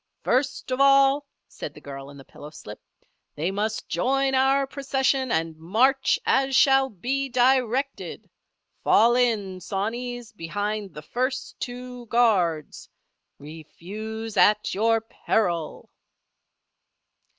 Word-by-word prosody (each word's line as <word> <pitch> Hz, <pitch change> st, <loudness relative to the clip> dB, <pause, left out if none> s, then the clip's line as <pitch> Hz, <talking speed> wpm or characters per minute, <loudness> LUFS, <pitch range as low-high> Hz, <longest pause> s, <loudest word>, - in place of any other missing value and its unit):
"First 260 Hz, +1 st, 0 dB
of 255 Hz, +1 st, 0 dB
all," 275 Hz, +1 st, +5 dB, 0.2 s
said -, -, -8 dB
the -, -, -11 dB
girl 135 Hz, -1 st, -9 dB
in 140 Hz, -, -12 dB
the 135 Hz, -, -13 dB
pillowslip, 145 Hz, -8 st, -11 dB, 0.6 s
"they 165 Hz, +5 st, -1 dB
must 215 Hz, +2 st, -3 dB
join 270 Hz, +9 st, 0 dB
our 270 Hz, +1 st, +3 dB
procession 270 Hz, -1 st, -1 dB
and 160 Hz, 0 st, -1 dB
march 230 Hz, -, +2 dB
as 270 Hz, 0 st, +2 dB
shall 270 Hz, 0 st, +5 dB
be 265 Hz, +7 st, -3 dB
directed. 255 Hz, +1 st, 0 dB, 0.6 s
Fall 235 Hz, +2 st, +5 dB
in, 215 Hz, -7 st, 0 dB
sawneys, 235 Hz, +5 st, -4 dB
behind 205 Hz, +2 st, -4 dB
the 150 Hz, -, -8 dB
first 255 Hz, -, -3 dB
two 250 Hz, -1 st, -7 dB
guards. 185 Hz, -10 st, +1 dB, 0.5 s
Refuse 205 Hz, +9 st, -8 dB
at 210 Hz, 0 st, +4 dB
your 225 Hz, +3 st, +2 dB
peril!" 180 Hz, -7 st, -2 dB
230 Hz, 110 wpm, -25 LUFS, 190-265 Hz, 0.6 s, all